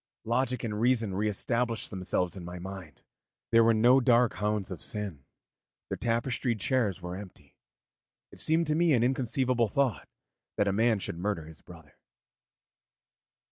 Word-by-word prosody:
Logic 125 +2 0
and 105 -2 -3
reason 115 -4 +2
re 105 +3 0
established 115 +2 -1
themselves 90 -2 -1
in 95 - -8
my 90 +1 -7
mind, 90 -6 -9 0.5
there 115 0 +6
were 115 - +5
no 120 +4 +5
dark 120 -2 +4
hounds 105 -2 -2
of 90 - -6
sin, 100 -10 -5 0.7
the - - 0
tapestried 115 0 -1
chairs 105 -6 0
were 90 0 -5
empty. 95 -1 -12 0.8
It - - -10
seemed 160 +2 +2
to 150 -1 0
me 170 -1 +3
an 120 -3 +3
inconceivable 125 -1 +1
thought 135 -4 0 0.5
that 100 - +2
a 100 - +1
man 110 +2 +3
should 85 -3 -5
murder 95 -4 -2
his 80 0 -14
brother. 80 -5 -15
110 Hz, 155 wpm, -29 LUFS, 95-125 Hz, 0.8 s, there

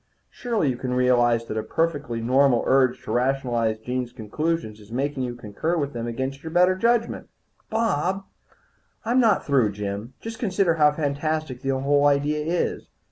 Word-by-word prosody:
Surely 230 - -1
you 125 - -5
can 125 0 -3
realize 120 -2 +3
that 110 - -5
a - - +1
perfectly 145 -5 -1
normal 130 +1 +3
urge 130 -2 +2
to - - -6
rationalize 120 -3 0
Jean's 125 +2 -4
conclusions 120 +1 -3
is 105 +1 -16
making 135 +2 -2
you 125 -1 -3
concur 120 +10 -3
with 145 -2 -2
them 120 -1 -4
against 130 +3 -4
your 160 - -6
better 180 +2 +4
judgment." 230 +3 0 0.4
"Bob 195 -4 0 0.4
" - - -39
"I'm 240 +3 +2
not 225 -5 +3
through, 125 -8 +2
Jim. 105 +4 -5
Just 225 +1 -7
consider 190 -6 +2
how 150 -2 +4
fantastic 150 -2 -2
the 135 -1 -1
whole 145 +1 +3
idea 145 +1 +1
is. 170 +3 -2
135 Hz, 170 wpm, -24 LUFS, 120-165 Hz, 0.4 s, better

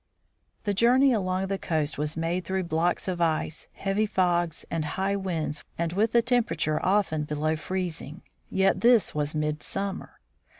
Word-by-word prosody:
The 205 - 0
journey 250 +6 +5
along 185 -3 0
the 195 0 -2
coast 155 -4 -1
was 150 +1 -1
made 170 +3 -1
through 190 0 -1
blocks 170 +2 0
of 180 -2 -2
ice, 155 -1 0
heavy 200 +2 0
fogs, 175 -4 +1
and 165 -2 -1
high 190 +6 -1
winds, 165 -6 -3 0.3
with 220 +5 +1
a 235 - +5
temperature 170 -11 +1
often 185 -6 +2
below 150 +1 -1
freezing. 170 -1 -4 0.3
Yet 195 0 +2
this 235 -2 +4
was 150 0 -1
midsummer! 155 +6 -3
180 Hz, 145 wpm, -27 LUFS, 155-195 Hz, 0.3 s, journey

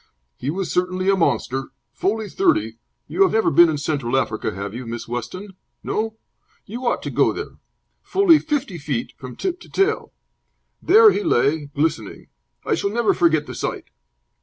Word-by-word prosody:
He 130 - -5
was 185 +4 -3
certainly 185 +1 +1
a - - +3
monster 135 -6 0 0.3
fully 215 +2 -1
thirty 330 - 0 0.3
you - - -2
have 385 - +5
never 220 0 +2
been 175 -1 +7
in 155 - -1
Central 140 -4 -1
Africa, 110 -4 -1
have 100 +2 -6
you, 120 +1 -7
Miss 115 0 -6
Weston? 150 - -6 0.3
No? 220 0 -2 0.5
You 240 +4 -5
ought - - 0
to - - -4
go - - +3
there! - - -7 0.4
fully 375 -5 +4
fifty 285 - -3
feet 140 -5 -3
from 130 -2 -10
tip 365 -1 -3
to - - -15
tail. 390 +3 0 0.7
There 430 +3 +7
he 410 - -1
lay, 155 - +1
glistening. 140 -7 -3 0.4
I - - +1
shall 200 - 0
never 230 +2 +2
forget 160 -3 +2
the - - -8
sight." - - -5
185 Hz, 170 wpm, -21 LUFS, -, 0.7 s, been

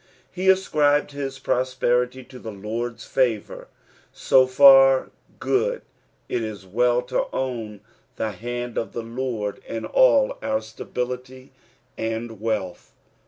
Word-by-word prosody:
He 190 +1 0
ascribed 150 -6 +3
his 135 -2 -5
prosperity 130 0 0
to 130 0 -13
the 110 - -8
Lord's 115 +3 -5
favour 120 -6 -1 0.3
— - - -30
so 130 -1 +3
for 135 0 +6 0.3
good, 485 +5 0 0.4
it 120 - -2
is 110 -3 -6
well 120 +5 +1
to 125 - -1
own 115 -6 -4 0.3
the 110 - -2
hand 120 +4 -4
of 115 - -5
the 115 - -4
Lord 115 -3 -4
in 115 -1 -5
all - - +3
our 275 - -1
stability 125 +1 -6 0.5
and 115 -1 -4
wealtti. 105 -5 -3
125 Hz, 125 wpm, -23 LUFS, 115-135 Hz, 0.5 s, for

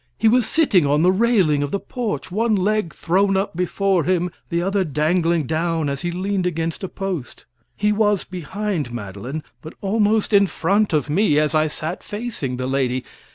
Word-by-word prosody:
He 225 - +2
was 240 +1 +4
sitting 280 - +3
on 145 +2 +2
the 180 - +5
railing 190 -8 +3
of 145 - -1
the 200 - -1
porch, 230 -5 -4
one 220 +3 +1
leg 205 -2 0
thrown 195 +3 +1
up 195 -3 -2
before 180 0 +1
him, 180 +1 0 0.2
the 170 - 0
other 195 +2 +1
dangling 165 +1 +1
down 160 0 -1
as 140 0 -3
he 175 - -2
leaned 185 +1 -1
against 165 +1 -3
a 190 - -3
post. 185 -10 -5 0.3
He 210 +1 +2
was 210 -2 +2
behind 185 - -4
Madeline, 120 +7 -6 0.2
but 155 - -10
almost 210 +1 +1
in 200 -1 +6
front 200 +5 +1
of 150 -4 +1
me, 155 0 +2
as 150 0 +2
I 155 0 +3
sat 155 +3 -5
facing 205 - -4
the 130 - -3
lady. 130 -1 0
180 Hz, 185 wpm, -21 LUFS, 155-205 Hz, 0.3 s, in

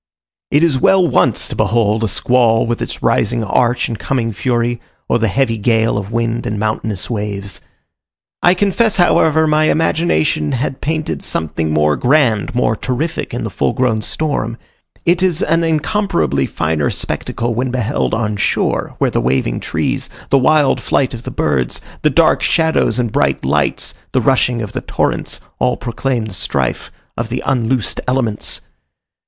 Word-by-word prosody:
It 145 +3 +3
is 150 -6 +2
well 185 +5 +4
once 125 -7 +2
to - - -5
behold 110 0 +1
a - - +2
squall 115 +2 +2
with 120 0 -2
its - - -5
rising 115 +1 +1
arch 120 +4 +1
and 115 -3 -5
coming 115 -4 -1
fury, 120 +1 -1 0.3
or 115 - +2
the 115 - +2
heavy 115 +1 0
gale 115 +1 +2
of 105 0 -4
wind 115 0 -1
and 105 - -2
mountainous 110 -2 -2
waves. 100 -3 -4 0.8
I 175 +1 +5
confess, 205 +4 +1
however, 160 -3 +4
my 155 0 +3
imagination 155 - +1
had 130 +1 -3
painted 155 +1 -2
something 80 0 -2
more 75 -1 +2
grand, 125 -5 +2
more 115 -2 +2
terrific 130 +8 -3
in - - -4
the - - -4
full - - 0
grown 120 -4 +1
storm. 115 -3 -2 0.5
It 175 +1 +3
is 185 -2 +1
an 165 +1 +2
incomparably 160 - 0
finer 75 -2 -1
spectacle 120 0 -3
when 125 +3 -1
beheld 125 -1 -1
on 110 -2 -1
shore, - - 0
where - - +1
the - - 0
waving 65 -1 0
trees, - - -2 0.2
the 135 - +5
wild 145 +1 +3
flight 130 -2 0
of 115 - -6
the - - -3
birds, 65 -4 -1 0.2
the 150 - +3
dark 155 +3 +3
shadows 160 -4 +2
and 120 -3 -1
bright - - 0
lights, 70 +1 0 0.2
the - - +3
rushing 125 -3 +2
of 105 - -7
the - - -3
torrents - - -2 0.2
all 65 - +1
proclaim 120 0 -2
the 110 - -7
strife - - -2 0.2
of 115 0 -3
the 125 +2 -3
unloosed 125 -2 0
elements. 125 -5 -1
120 Hz, 165 wpm, -16 LUFS, 105-145 Hz, 0.8 s, I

